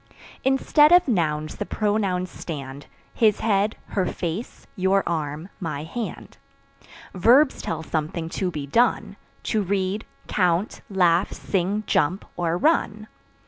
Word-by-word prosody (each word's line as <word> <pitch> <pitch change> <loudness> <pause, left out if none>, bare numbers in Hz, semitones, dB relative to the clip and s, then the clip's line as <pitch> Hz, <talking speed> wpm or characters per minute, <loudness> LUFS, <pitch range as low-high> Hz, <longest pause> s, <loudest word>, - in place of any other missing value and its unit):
Instead 280 +3 +4
of 355 -1 +6
Nouns 155 - 0
the - - -2
Pronouns 200 -4 0
stand 140 -3 -7 0.3
His 215 -3 +2
head, 210 0 +1
her 190 -3 0
face, 175 +8 -5
your 195 0 +2
arm, 155 +1 -3
my 155 -5 -4
hand. 225 +8 -6 0.7
Verbs 255 - +4
tell - - -4
something 160 +1 -3
to 185 +2 -2
be 150 -5 -5
done 215 - +1 0.3
To 215 - 0
read, 195 +1 -1 0.2
count, 180 +1 0
laugh, 180 -2 +3
sing, 195 +3 -1
jump 180 +4 +1
or 170 -1 0
run. 215 - +1
190 Hz, 125 wpm, -24 LUFS, 165-215 Hz, 0.7 s, of